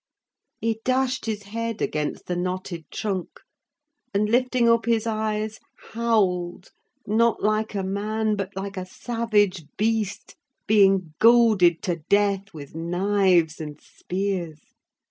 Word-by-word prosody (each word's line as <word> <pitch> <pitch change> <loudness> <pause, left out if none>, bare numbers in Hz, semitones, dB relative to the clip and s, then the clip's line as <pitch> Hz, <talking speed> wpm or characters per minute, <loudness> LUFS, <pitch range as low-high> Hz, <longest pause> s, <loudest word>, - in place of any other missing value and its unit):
He 225 0 -1
dashed 260 -1 0
his 210 -2 -3
head 230 +2 -4
against 150 -1 -2
the 180 - -2
knotted 180 -2 -4
trunk; 195 -5 -4 0.7
and, 210 +1 +2
lifting 250 +1 +2
up 230 0 +3
his 230 -1 +2
eyes, 215 -1 -2 0.3
howled, 190 -7 0 0.3
not 225 +2 +2
like 215 0 0
a 195 - -1
man, 210 +3 -1
but 195 -2 -3
like 195 0 -5
a 185 - -3
savage 210 -6 0
beast 220 -2 -1 0.3
being 195 -5 +4
goaded 220 -7 +5
to 175 -5 -1
death 200 -1 +2
with 145 -3 -10
knives 175 0 +2
and 150 -1 -7
spears. 180 -5 -4
205 Hz, 125 wpm, -24 LUFS, 185-225 Hz, 0.7 s, goaded